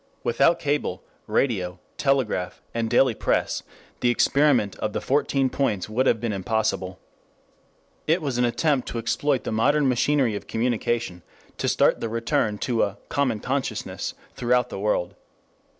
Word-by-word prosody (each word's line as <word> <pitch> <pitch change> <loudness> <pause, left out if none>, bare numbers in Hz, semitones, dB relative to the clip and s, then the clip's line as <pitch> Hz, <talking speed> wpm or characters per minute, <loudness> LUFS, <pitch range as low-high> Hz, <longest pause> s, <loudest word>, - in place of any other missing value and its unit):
Without 135 +8 +3
cable, 145 0 -2 0.2
radio, 95 -9 0 0.2
telegraph, 130 -10 0
and 115 -1 -1
daily 125 +1 +4
press, - - 0 0.4
the 125 - +2
experiment 130 -3 +3
of 105 - -3
the - - -1
Fourteen 135 -1 +1
Points 115 -8 -1
would 125 +5 +1
have 115 - +3
been 115 -1 -2
impossible. 95 -2 -1 1.1
It 165 +3 +3
was 140 -7 -2
an - - +3
attempt 135 +2 +1
to - - -4
exploit 130 +4 0
the - - -3
modern 140 +6 +3
machinery 125 -1 +2
of 100 - -7
communication 115 -4 -1 0.4
to - - 0
start - - +3
the 115 - -3
return 110 -2 0
to 120 -3 +1
a 100 -1 0
"common 125 -7 0
consciousness" 135 +1 -3 0.2
throughout 125 0 +1
the - - -6
world. 100 -4 0
120 Hz, 150 wpm, -24 LUFS, 110-135 Hz, 1.1 s, daily